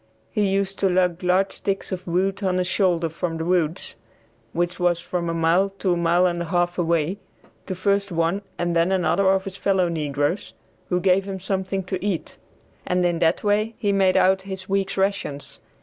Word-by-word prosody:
He 210 -1 +1
used 195 0 -1
to 195 - +3
lug 180 -1 +1
large 185 +2 +2
sticks 195 0 -2
of 185 -1 -5
wood 190 +3 0
on 185 -2 +1
his 180 - +1
shoulders 175 -3 +1
from 165 -1 -3
the 160 - -3
woods, 175 -2 0 0.6
which 175 +4 -1
was 175 -1 +2
from 175 0 -3
a - - -1
mile 165 +4 +3
to 185 -3 +1
a - - +1
mile 170 +1 +3
and 175 -1 0
a - - -2
half 175 +1 0
away, 170 +2 0 0.5
to 185 - -3
first 200 +1 0
one 170 +3 0 0.2
and 175 0 -1
then 170 +2 +3
another 190 +1 +2
of 190 0 +2
his 195 0 -7
fellow 190 -3 +2
negroes, 150 +2 -2 0.4
who 180 - +1
gave 190 +1 +3
him 190 -1 -4
something 190 0 -2
to 185 0 -4
eat; 200 -5 -3 0.4
and 180 0 +1
in 175 -1 +1
that 165 0 +2
way 215 +2 +1
he 205 - 0
made 195 -2 +3
out 190 +1 +4
his 190 -1 -7
week's 195 0 -1
rations. 190 -7 -2
185 Hz, 195 wpm, -23 LUFS, 170-195 Hz, 0.6 s, out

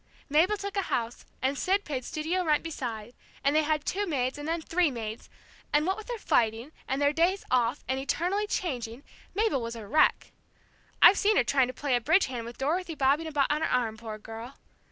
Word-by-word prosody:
Mabel 340 +9 +3
took 400 0 -5
a - - +3
house, 235 0 -2 0.2
and 265 +2 +1
Sid 385 +8 +1
paid 265 -4 -3
studio 325 +7 -2
rent 305 -3 +2
beside, 240 -8 -5 0.3
and 280 +2 +2
they 310 - +5
had 305 -1 0
two 405 +2 -1
maids, 265 -3 -1
and 290 - -6
then 335 +1 0
three 335 +1 +1
maids, 225 -3 -6 0.4
and 295 +1 +3
what 380 +2 +1
with 435 - -10
their 485 -1 -3
fighting, 230 - +1 0.2
and 265 - -1
their 285 0 +3
days 350 +5 +1
off, 250 +2 +1
and 260 0 -1
eternally 360 +9 -1
changing, 250 - -3 0.3
Mabel 420 - +1
was 230 0 -5
a 225 -2 -8
wreck. 305 +9 +2 0.7
I've 395 - +9
seen 420 +1 +3
her - - +5
trying 275 -3 +2
to 255 - -6
play 280 -3 0
a 245 - +1
bridge 320 - +4
hand 245 -3 -5
with 235 - -9
Dorothy 330 +5 -1
bobbing 285 +4 +2
about 290 -3 +1
on 300 +1 0
her - - 0
arm 230 -3 +1
poor 220 -1 -7
girl! 225 +4 -9
290 Hz, 215 wpm, -28 LUFS, 245-340 Hz, 0.7 s, I've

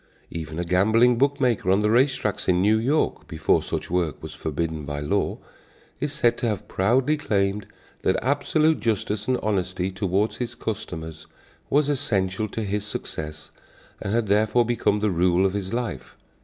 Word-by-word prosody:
Even 80 -1 -6
a 85 - -1
gambling 110 +7 +3
book 140 +1 +2
maker 120 -8 +1
on 95 +2 +4
the 105 0 +2
race 130 +3 +4
tracks 105 - -3
in 90 -1 +3
New 105 +4 +4
York, 140 +7 0
before 80 -3 +1
such - - -4
work 85 -5 -1
was - - -7
forbidden 80 0 -3
by 70 0 -4
law, 75 - 0 0.6
is 145 +1 -2
said 130 -6 +1
to 120 - 0
have 105 -4 -3
proudly 125 +10 +2
claimed 100 -6 0 0.3
that 95 - +2
absolute 150 +3 +2
justice 105 -1 -1
and 130 -1 +2
honesty 95 -2 -1
toward 95 +2 0
his 120 -1 -4
customers 80 -8 -6 0.4
was 145 0 +3
essential 105 -7 0
to 110 +2 -4
his 105 0 -2
success 75 -6 -6 0.5
and 100 - -3
had 115 0 +1
therefore 110 +4 +3
become 110 -3 +1
the 105 -1 +2
rule 90 +1 +3
of 95 - +1
his 100 -2 -3
life. 115 - -4
105 Hz, 170 wpm, -24 LUFS, 90-120 Hz, 0.6 s, on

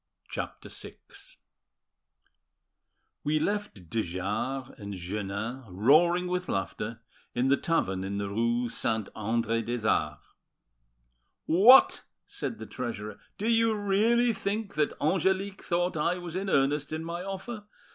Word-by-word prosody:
CHAPTER - - -5
VI - - -9 2.3
We 150 +1 +1
left 205 - -2
de 115 +7 0
Jars 105 +9 -3
and 100 -1 -6
Jeannin, 100 +7 -4
roaring 155 - +4
with 180 0 -2
laughter, 110 +3 -3 0.3
in 125 +2 +2
the 140 - +5
tavern 95 - 0
in 100 +1 -3
the 100 0 -2
rue 115 +4 0
Saint 110 -2 -1
Andre 115 +1 0
des 115 -1 -2
Arts. - - 0 1.2
"What!" 220 +11 +7 0.2
said 405 - -5
the - - -7
treasurer, 105 -5 -5 0.2
"do 210 - -2
you 230 -1 +3
really 220 +4 +3
think 200 0 -3
that 150 -1 0
Angelique 190 +4 0
thought 175 0 0
I 165 +4 +1
was 175 -1 -7
in 195 +1 -2
earnest 140 -1 +2
in 160 +1 -3
my 170 +1 -4
offer? 195 +3 -6
150 Hz, 130 wpm, -29 LUFS, -, 2.3 s, What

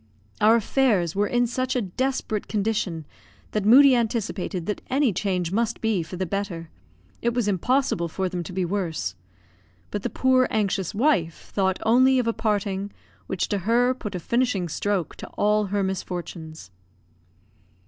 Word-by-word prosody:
Our 215 +2 +6
affairs 215 - +2
were 205 +1 +2
in 245 0 +2
such 255 +2 -2
a 250 - +2
desperate 220 +1 -2
condition 200 -6 -1 0.5
that 215 - -1
Moodie 265 +4 +8
anticipated 215 -6 -2
that 210 - -3
any 265 -4 +2
change 180 -2 -1
must 230 +3 0
be 220 -5 +1
for 165 +3 -7
the 185 - -1
better; 175 -3 -4 0.5
it 235 0 0
was 240 -4 +1
impossible 205 -1 +1
for 190 +3 -2
them 180 -1 -3
to - - -7
be 185 0 -1
worse. 170 - -2 0.8
But 205 - -3
the - - -2
poor, 260 -1 +3
anxious 200 -3 -1
wife 200 - 0
thought 190 -2 +1
only 260 +4 +5
of 250 - +1
a 230 - +1
parting 205 -2 -1 0.4
which 190 - -1
to 205 - 0
her 240 +6 +2
put 210 -6 -6
a - - -2
finishing 235 -2 0
stroke 195 +1 -1
to - - -8
all 210 0 +2
her 200 +1 0
misfortunes. 175 - -5
205 Hz, 160 wpm, -24 LUFS, 185-235 Hz, 0.8 s, Moodie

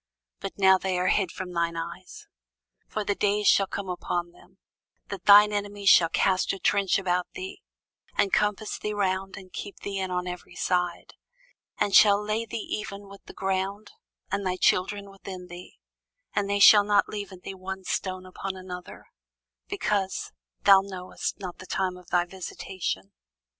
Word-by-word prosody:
but - - -6
now 190 -1 +6
they 185 -1 -1
are 180 +1 +1
hid 190 -4 +2
from 180 -1 -7
thine 170 -1 0
eyes. 170 +2 -7 0.6
For 215 - -3
the 205 - 0
days 205 +1 0
shall 195 - +5
come 200 0 -5
upon 175 -1 -3
thee, - - -21 0.5
that 195 -3 -7
thine 210 +1 +8
enemies 205 -1 0
shall 165 -2 +7
cast 185 +2 +2
a - - -4
trench 200 0 +2
about 180 -2 0
thee, 380 +1 -7 0.6
and 200 - +2
compass 210 0 0
thee 210 0 -3
round, 195 -1 -1
and 185 -2 -12
keep 200 - -7
thee 195 -1 -4
in 190 -1 -2
on 180 0 -2
every 180 0 -7
side, 180 -1 -1 0.6
and 200 - 0
shall 205 -1 +7
lay 215 +2 -2
thee 220 - -4
even 205 -2 -5
with 200 0 -13
the - - -11
ground, 195 +2 -2 0.4
and 200 +1 -1
thy 185 -1 0
children 200 +2 +1
within 185 -2 -9
thee; 175 +1 -11 0.6
and 200 -1 0
they 200 0 +1
shall 205 +1 +9
not 205 0 +3
leave 205 -1 -6
in 185 -1 -12
thee 195 - -6
one 190 0 -7
stone 185 0 -3
upon 190 +1 -5
another; 180 -1 -9 0.6
because 205 - -1 0.3
thou 195 -1 +8
knewest 185 -2 -5
not 185 -3 -7
the 185 - -10
time 185 -1 -1
of 180 -1 -14
thy 175 0 +2
visitation. 175 - -5
190 Hz, 175 wpm, -27 LUFS, 180-205 Hz, 0.6 s, shall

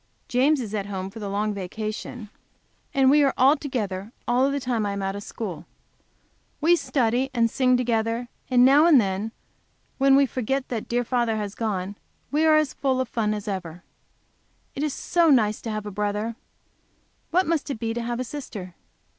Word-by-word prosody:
James 270 +4 +3
is 220 -4 -5
at 200 -2 -2
home 190 -1 -5
for 225 - -9
the 205 -2 -4
long 210 +1 -1
vacation 215 +3 -6 0.6
and 265 -1 +4
we 295 0 +5
are 270 +1 +4
together 210 -7 -4 0.2
all 255 +3 +3
the 280 0 -1
time 245 -4 -1
I 200 -1 -1
am 200 0 -3
out 195 0 -2
of 200 - -5
school. 180 -7 -6 0.9
We 335 +3 +5
study 255 -4 0
and 230 -1 +2
sing 255 -1 +3
together 230 0 0 0.2
and 250 -1 +5
now 285 +5 +6
and 305 -6 +7
then, 200 +1 -1 0.7
when 270 0 +5
we 280 0 +5
forget 260 +2 -2
that 230 -4 -4
dear 245 +1 0
father 235 -2 0
has 205 -2 -4
gone, 205 -3 -3 0.3
we 305 +2 +2
are 310 - +6
as 305 -3 +1
full 265 -2 0
of 260 -2 -1
fun 215 -2 0
as 210 0 -7
ever. 180 -3 -5 0.9
If 275 - -5
it - - +1
is 290 - -4
so 340 -2 +2
nice 215 -6 +3
to 230 - -5
have 215 -1 -3
a 205 - -5
brother, 210 +3 -2 0.9
what 365 +3 +2
must 320 -3 -1
it 275 - -3
be 225 0 -2
to 240 - -3
have 235 +1 -3
a - - 0
sister! 225 -9 -7
235 Hz, 195 wpm, -25 LUFS, 210-270 Hz, 0.9 s, and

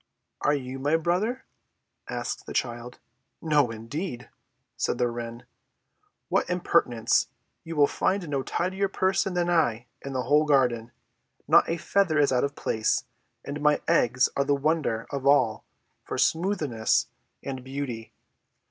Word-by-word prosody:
"Are 145 - +3
you 130 -1 -5
my 145 +4 +2
brother?" 185 +10 -1 0.6
asked - - -4
the - - -6
child. 120 0 -3 0.4
"No 150 -5 +2
indeed!" 120 - -6 0.4
said - - -1
the 125 -1 +2
wren. 120 0 -6 0.8
"What - - 0
impertinence! 140 -10 +2 0.4
You 165 0 -6
will 145 -1 +6
find 185 +5 -1
no 140 -2 -1
tidier 190 +7 -1
person 190 -1 0
than 175 -1 +1
I 125 -10 +1 0.2
in 140 - -6
the 130 -1 -1
whole 150 +5 +3
garden. 125 -5 +2 0.6
Not - - +5
a 165 - 0
feather 185 -4 +1
is 145 -2 +4
out 125 -1 +2
of 140 0 -2
place, 110 -1 0 0.4
and 145 +1 -5
my 150 0 +3
eggs 130 -6 +3
are 140 - +2
the 140 +1 +2
wonder 140 -6 0
of 140 -1 -2
all 130 -6 +3 0.4
for - - -5
smoothness 160 - +1 0.4
and 130 -2 -5
beauty. 130 -4 -5
140 Hz, 145 wpm, -26 LUFS, 125-165 Hz, 0.8 s, will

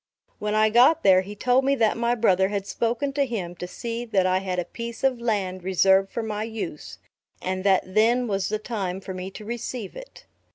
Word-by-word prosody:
When 210 0 -1
I 215 0 +4
got 255 +7 +5
there, 185 -2 +6
he 200 +2 -8
told 250 +5 +2
me 275 +1 +2
that 225 -5 +2
my 235 +1 +1
brother 190 -5 +3
had 200 -1 -3
spoken 240 +6 -1
to 285 0 +2
him 190 -8 -4
to 180 - -5
see 235 +5 -5
that 205 -6 +1
I 185 0 +2
had 185 -1 -3
a 180 - -1
piece 235 +1 -7
of 260 -3 +1
land 195 -5 -1
reserved 190 +1 +3
for 235 - -3
my 210 -1 -3
use; 180 - -6 0.4
and 185 0 -3
that 195 -2 +4
then 225 +6 +2
was 195 -3 -1
the 215 - 0
time 200 -4 -4
for 190 0 -7
me 185 +1 -5
to 210 +2 -10
receive 235 -2 -5
it. - - -12
210 Hz, 215 wpm, -25 LUFS, 190-235 Hz, 0.4 s, there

